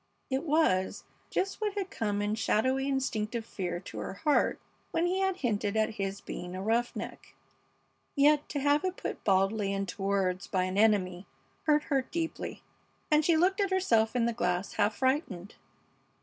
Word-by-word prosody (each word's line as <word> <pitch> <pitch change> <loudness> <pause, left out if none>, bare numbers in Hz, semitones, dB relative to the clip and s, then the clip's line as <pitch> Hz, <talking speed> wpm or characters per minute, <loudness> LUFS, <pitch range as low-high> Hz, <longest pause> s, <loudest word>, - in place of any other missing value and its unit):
It 265 +4 0
was 295 - +2 0.3
just 390 +3 -2
what 420 -1 -1
had 390 -2 -3
come 205 -2 -1
in 205 +1 0
shadowy, 260 +5 +1
instinctive 235 -4 -1
fear 180 -5 -4
to - - -8
her - - -5
heart 295 +7 +2 0.3
when 335 - +1
he 365 +2 +1
had 385 -1 +1
hinted 215 - -1
at 220 +1 +2
his 195 -1 -4
being 180 +1 -6
a 185 - -4
"roughneck," 235 +3 -2 0.8
yet 295 +1 +4
to 290 - -2
have 290 +1 +3
it 370 0 -2
put - - -5
baldly 195 +1 +2
into 195 0 -3
words 195 -1 0
by 185 -2 +1
an 185 +1 -2
enemy 195 -4 +2 0.4
hurt 300 -1 +4
her 275 -3 +1
deeply, 325 +5 -4 0.5
and 305 0 +5
she 325 +1 +4
looked 380 +5 +3
at 395 - +1
herself 240 -13 +2
in 240 -2 +2
the 235 - 0
glass 180 -4 -1
half 210 0 +1
frightened. 260 - -1
225 Hz, 170 wpm, -30 LUFS, 195-300 Hz, 0.8 s, and